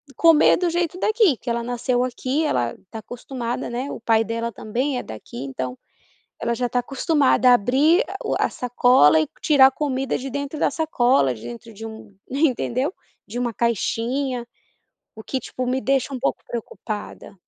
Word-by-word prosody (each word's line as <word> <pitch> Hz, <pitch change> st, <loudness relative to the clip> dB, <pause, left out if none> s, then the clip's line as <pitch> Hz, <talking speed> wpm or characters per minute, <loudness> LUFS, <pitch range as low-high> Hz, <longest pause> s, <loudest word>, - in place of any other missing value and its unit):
comer 330 Hz, -2 st, +6 dB
do 360 Hz, -, 0 dB
jeito 345 Hz, 0 st, -1 dB
daqui, 430 Hz, -, +3 dB
que -, -, -7 dB
ela 235 Hz, 0 st, -1 dB
nasceu 245 Hz, +1 st, 0 dB
aqui, 255 Hz, +4 st, -1 dB
ela 120 Hz, -, 0 dB
está 220 Hz, +4 st, -11 dB
acostumada 240 Hz, +1 st, -5 dB
né, 250 Hz, +3 st, -3 dB
o -, -, -6 dB
pai 225 Hz, -1 st, +3 dB
dela 230 Hz, +1 st, -3 dB
também 250 Hz, +6 st, -2 dB
é -, -, -3 dB
daqui 110 Hz, +3 st, -8 dB
então, 130 Hz, -1 st, -5 dB, 0.6 s
ela 235 Hz, -, -1 dB
já 245 Hz, +1 st, -1 dB
está 245 Hz, +1 st, 0 dB
acostumada 270 Hz, -1 st, +2 dB
a -, -, +8 dB
abrir 285 Hz, -, +3 dB
a -, -, -7 dB
o -, -, 0 dB
a -, -, +3 dB
sacola 245 Hz, -, +4 dB
e 155 Hz, -, +1 dB
tirar 285 Hz, -4 st, +6 dB
a 270 Hz, -, 0 dB
comida 270 Hz, -2 st, -1 dB
de 270 Hz, -, -5 dB
dentro 285 Hz, +2 st, -4 dB
da -, -, +3 dB
sacola, 255 Hz, -, +2 dB
de 110 Hz, -, -13 dB
dentro 120 Hz, -, -9 dB
de 220 Hz, +2 st, -10 dB
um 220 Hz, -2 st, -10 dB
entendeu? 275 Hz, +2 st, 0 dB, 0.3 s
De 235 Hz, +4 st, -5 dB
uma 245 Hz, -1 st, -1 dB
caixinha, 235 Hz, +3 st, -1 dB, 0.7 s
o 220 Hz, -, -10 dB
que 265 Hz, -, -2 dB
tipo 255 Hz, +1 st, -5 dB
me 255 Hz, +1 st, +1 dB
deixa 270 Hz, +3 st, 0 dB
um 255 Hz, -, -4 dB
pouco 270 Hz, -, -1 dB
preocupada. 215 Hz, -2 st, -6 dB
245 Hz, 180 wpm, -22 LUFS, 225-275 Hz, 0.7 s, a